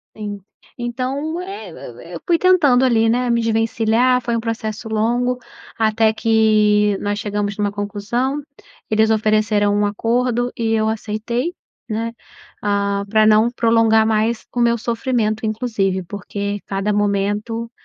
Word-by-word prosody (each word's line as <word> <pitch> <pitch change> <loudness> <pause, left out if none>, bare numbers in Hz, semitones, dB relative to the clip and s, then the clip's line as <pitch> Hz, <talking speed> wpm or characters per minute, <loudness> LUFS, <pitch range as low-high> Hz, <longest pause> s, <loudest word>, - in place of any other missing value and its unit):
Sim, 205 -2 -6 0.4
Então 265 +7 -3
e 390 +3 -7
eu - - -12
eu - - -10
eu - - -9
fui 340 -2 +4
tentando 315 -9 +4
ali, 225 -3 +3
né, 245 +1 +1
me 235 0 +2
desvencilhar 225 +2 +2
foi 235 -1 -1
um 230 - -1
processo 225 -1 -4
longo, 240 +3 0 0.4
até 220 0 +3
que 215 -2 +3
nós 205 0 -2
chegamos 205 -1 -3
numa 205 -1 0
conclusão, 215 +8 -2 0.5
eles 220 +1 +3
ofereceram 215 -1 +2
um 205 0 +2
acordo 240 +3 0
e 225 -1 0
eu 220 0 +1
aceitei, 225 - -3 0.3
né, 225 +1 -2 0.5
ah, 200 -1 0
pra 215 0 +4
não 215 +2 +5
prolongar 225 -2 +3
mais 220 +1 0
o 245 - -2
meu 235 0 +3
sofrimento. 230 -1 -1
Inclusive 215 -4 -1
porque 200 +2 -5
cada 195 +1 -1
momento, 205 +3 -1
220 Hz, 140 wpm, -19 LUFS, 210-240 Hz, 0.5 s, não